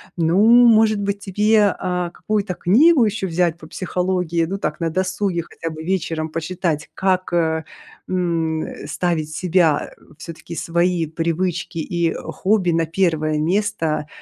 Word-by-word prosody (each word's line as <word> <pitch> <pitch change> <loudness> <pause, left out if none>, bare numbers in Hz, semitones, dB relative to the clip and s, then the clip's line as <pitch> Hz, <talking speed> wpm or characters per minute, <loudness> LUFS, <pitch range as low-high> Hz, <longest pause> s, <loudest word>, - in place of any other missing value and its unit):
Ну, 175 +5 +3 0.2
может 220 -2 +4
быть, 200 0 -1
тебе, 210 +1 +2
а, 180 -2 -2
какую-то 205 +1 -2
книгу 260 - +4
еще 210 -2 -1
взять 170 -2 0
по 160 - -13
психологии, 180 -1 -1
ну 195 +4 -4
так - - -3
на 165 -1 -1
досуге, 185 0 -1
хотя 165 0 -7
бы 155 - -8
вечером 160 -2 -2
почитать? 165 -1 -3
Как, 185 -2 0
э, 160 -2 +1 0.4
м, 165 -3 -1
э, - - -8
ставить 170 -3 -1
себя, 160 +1 +1
э, - - -28 0.2
всё-таки 165 0 -9
свои 170 0 0
привычки 165 +2 -2
и 165 +1 -1
хобби 180 +3 0
на 165 0 +1
1 160 -3 0
место, 165 -3 -1
175 Hz, 145 wpm, -20 LUFS, 165-190 Hz, 0.4 s, может